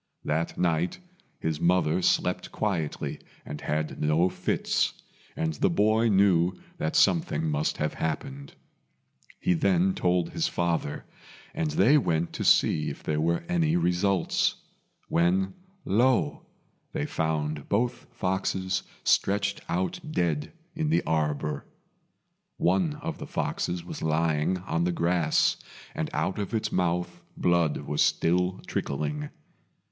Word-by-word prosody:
That 80 +2 -1
night 85 0 +1 0.4
his 80 -1 -2
mother 90 -1 +3
slept - - +1
quietly 85 -8 -2 0.3
and 75 - -7
had 75 +1 -2
no 80 +4 +3
fits, - - 0 0.4
and 80 -1 -1
the 75 - +1
boy 110 +5 +3
knew 95 -3 +4 0.2
that 80 - -1
something 80 -4 +3
must 75 0 0
have 75 - -1
happened. 135 - -4 0.8
He - - +2
then 95 +1 +2
told 90 -1 +1
his 165 0 0
father, 85 - -1 0.5
and 80 - -1
they 110 - +5
went 85 - 0
to - - -3
see 75 - +4
if - - -8
there 75 0 0
were 85 - +1
any 170 -2 +2
results; 95 - +1 0.5
when 95 +3 +2 0.3
lo! 120 +5 +2 0.5
they - - -1
found 75 -2 -2
both 120 +4 0
foxes 95 0 -1 0.2
stretched 100 0 +2
out 90 +1 -1
dead 85 - -1 0.2
in 160 -2 -1
the 165 - +2
arbour. 75 -2 -1 0.9
One 95 - +2
of 165 0 -4
the - - -6
foxes 90 -1 -2
was - - -7
lying 80 +2 +1
on 85 -2 -2
the 90 - +1
grass, 85 -1 +2 0.4
and - - -2
out 95 - -1
of 105 +3 -3
its 110 0 -1
mouth 90 -1 -1 0.2
blood 85 -3 +2
was 75 - -1
still 90 +2 +2
trickling. 75 +1 -3
85 Hz, 130 wpm, -27 LUFS, 80-95 Hz, 0.9 s, they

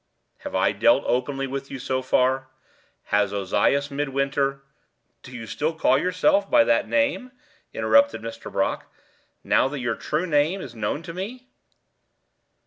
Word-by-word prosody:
"Have - - -7
I - - +3
dealt - - +3
openly 135 +2 -1
with 135 +1 -5
you 135 - -6
so 130 0 -2
far. 130 +1 +1 0.7
Has 105 -1 +3
Ozias 105 +8 +1
Midwinter 140 -1 -1 0.3
" - - -48
"Do - - -13
you 120 -3 -7
still 155 +8 -2
call 135 -4 +3
yourself 185 - +2
by 300 -1 +6
that 295 - +2
name," 280 -3 0 0.4
interrupted 280 - +3
Mr. 115 0 -7
Brock, - - -2 0.5
"now 135 - +2
your 120 -4 -1
true 155 +9 -2
name 160 +3 +1
is 135 -10 -8
known 110 +8 -3
to 165 - -8
me?" 245 +8 -7
140 Hz, 145 wpm, -24 LUFS, 130-180 Hz, 0.7 s, by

